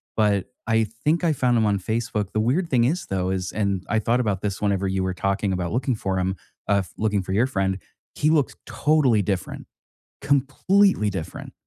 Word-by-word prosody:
but 105 -3 +2 0.2
I 110 0 +3 0.2
think 165 +4 +2
I 160 -2 +3
found 125 -3 +2
him 110 - +3
on 100 -1 +1
Facebook. 110 -1 -2
The 110 - -1
weird 145 +11 +1
thing 120 -3 +3
is 160 +9 0
though 95 -1 -1
is 95 -1 -2
and 100 -2 -1
I 110 - +2
thought 115 +3 +1
about 105 -6 0
this 100 -1 -3
whenever 100 -2 +1
you 95 0 -1
were 95 -1 -2
talking 100 +1 0
about 90 -2 -2
looking 125 0 0
for 95 -3 -2
him, 95 +1 0 0.3
uh, 100 -1 +3
f - - -17
looking 105 -3 0
for 95 - -4
your 115 +6 +3
friend, 95 -5 -1 0.3
he 155 - +1
looked 155 -4 +2
totally 135 -9 +2
different, 95 -1 -3 0.6
completely 140 - +2
different. 95 -5 -6
105 Hz, 200 wpm, -24 LUFS, 95-125 Hz, 0.6 s, I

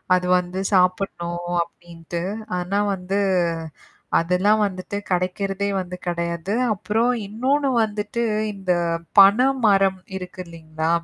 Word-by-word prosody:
அதுல 180 0 -1
வந்து 180 +1 -5
சாப்பிடணும் 175 -2 0
அப்படின்ட்டு. 170 0 -8 0.4
ஆனா 195 +3 -1 0.2
வந்து 190 +2 -2 1.0
அதெல்லாம் 185 +5 +2
வந்துட்டு 190 +1 -4
கிடைக்கிறதே 195 +2 -1
வந்து 180 0 -5
கிடையாது. 170 +2 -2 0.2
அப்புறம் 220 +5 0 0.2
இன்னொன்னு 270 +6 0
வந்துட்டு, 210 +2 -3 0.3
இந்த 190 -2 -2 0.5
பன 200 +4 +8 0.3
மரம் 195 -2 +4 0.2
இருக்கு 180 0 -9
இல்லிங்களா? 160 -1 -5
185 Hz, 105 wpm, -22 LUFS, 175-200 Hz, 1.0 s, பன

